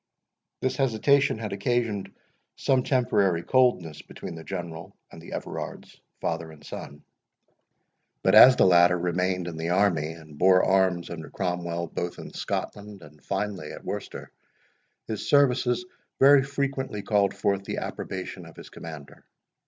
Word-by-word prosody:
This 130 - -1
hesitation 135 +1 +2
had 110 -2 -5
occasioned 110 0 -1 0.4
some 130 -1 +2
temporary 105 -10 +1
coldness 90 - +2
between - - -9
the 80 -1 -9
General 85 -3 -7
and - - -12
the - - -12
Everards, - - -7 0.2
father 80 -1 -3
and 75 -2 -15
son. 75 +1 -9 1.2
But - - +3
as 130 0 +10
the - - +4
latter 90 -1 +5
remained 90 +1 -1
in 85 -2 -6
the 80 +1 -3
army, 90 -5 +1
and 80 -3 -14
bore 95 0 +5
arms 95 -2 +2
under 80 -2 -7
Cromwell 85 -2 -3
both 85 +1 -5
in - - -10
Scotland, 105 -2 -5
and 75 0 -16
finally 100 -5 -3
at - - -11
Worcester, - - -6 0.7
his 110 -2 -5
services 135 +2 +3 0.3
very 140 0 +7
frequently 135 -5 -3
called 100 -2 +1
forth 100 0 0
the - - -4
approbation 95 -2 -6
of 80 - -14
his - - -12
commander. 75 -4 -10
95 Hz, 145 wpm, -26 LUFS, 85-120 Hz, 1.2 s, as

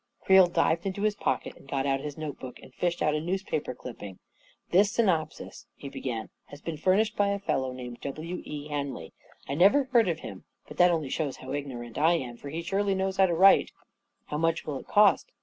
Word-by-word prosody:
Creel 190 -1 +6
dived 170 +1 +1
into 195 +1 -3
his 215 -1 +2
pocket 135 -10 -2
and - - -18
got 135 -1 -1
out 135 -1 +1
his 145 +1 -6
note 155 -3 -6
book 125 -1 -8
and 130 - -15
fished 175 +3 -1
out 150 - +2
a 155 - -1
newspaper 175 -5 -3
clipping. 105 -7 -9 0.3
" - - -33
This 200 +3 +4
synopsis/' 185 -10 -1
he 140 - -8
began, 115 -5 -5
" - - -52
has 145 - -11
been 165 +1 -5
furnished 195 +8 +2
by 205 - +2
a 200 0 0
fellow 150 -9 -1
'named 125 -1 -8
W. 160 +5 -5
E. 150 0 -7
Henley. 140 - -4 0.3
I 140 - -3
never 195 - +5
heard 245 -5 +3
of 160 -1 -2
him - - -9
— - - -39
but - - -11
that 180 0 +6
only 160 -5 -1
shows 145 -5 -2
how 130 - -9
ignorant 125 -5 -5
I 160 +3 +4
am, 125 -8 -3
for 140 - -9
he 165 +4 -4
surely 195 +3 0
knows 190 0 -1
how 190 0 +5
to 170 - 0
write 195 +3 +6
I - - -31 0.3
" - - -52
" - - -49
How 150 - -1
much 165 +1 0
will 140 -3 -4
it - - -14
cost 210 - +4
160 Hz, 240 wpm, -28 LUFS, 140-190 Hz, 0.3 s, Creel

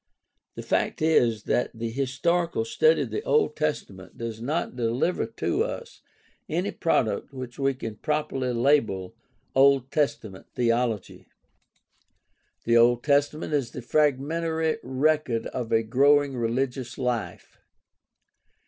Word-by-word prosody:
The - - -6
fact - - 0
is 120 -9 +3
that 125 - 0
the 115 0 -4
historical 165 - 0
study 470 - +3
of - - -7
the 420 - -2
Old 455 -2 +1
Testament 100 -11 -4
does 115 -1 -5
not 145 +2 -2
deliver 120 +5 0
to 115 - -1
us - - -7 0.5
any - - -1
product - - 0
which 125 -1 -8
we 135 -1 +1
can 115 -4 -6
properly 150 -4 -1
label 115 -7 +1 0.4
Old 135 -1 +4
Testament 110 -10 -2
theology. 115 -4 -1 1.4
The 115 0 +3
Old 120 +1 +4
Testament 145 +2 +1
is 140 -5 0
the 125 - -8
fragmentary 155 +4 0
record 130 -2 0
of 120 -3 -5
a 115 0 +3
growing 140 +4 +3
religious 125 +1 -2
life. 125 -3 -4
130 Hz, 120 wpm, -26 LUFS, 115-150 Hz, 1.4 s, Old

